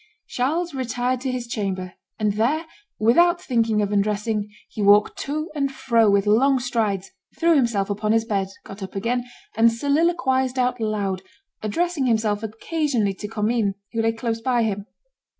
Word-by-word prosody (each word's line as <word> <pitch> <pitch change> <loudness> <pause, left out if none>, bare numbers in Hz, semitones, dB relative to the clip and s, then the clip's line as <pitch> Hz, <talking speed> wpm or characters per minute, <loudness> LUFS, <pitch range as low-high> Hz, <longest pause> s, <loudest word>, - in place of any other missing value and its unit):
Charles 320 +7 -1
retired 250 -1 -1
to 260 -1 -1
his 250 -1 -3
chamber; 190 -5 -3 0.2
and 210 -2 +1
there, 265 +10 +1 0.3
without 345 +11 +4
thinking 225 -4 +1
of 205 - -2
undressing, 210 +1 0 0.2
he 215 - -6
walked 205 +1 +5
to 310 +4 -3
and 280 -3 -1
fro 230 -5 +2
with 200 0 +3
long 260 +6 +4
strides, 220 -6 -1 0.3
threw 335 0 +4
himself 230 -8 +2
upon 210 +1 -1
his 225 0 +2
bed, 200 -3 0 0.2
got 195 +1 -10
up 190 0 -7
again, 240 +5 -1 0.3
and 230 +1 +5
soliloquized 265 -1 +1
out 250 -1 +1
loud, 205 -4 -1 0.4
addressing 295 +6 0
himself 220 -3 +1
occasionally 225 -1 -1
to 210 +2 -7
Commynes, 215 -1 0 0.2
who 225 - 0
lay 225 0 +2
close 225 0 -3
by 245 -1 +2
him. 205 -1 -2
230 Hz, 160 wpm, -23 LUFS, 210-260 Hz, 0.4 s, walked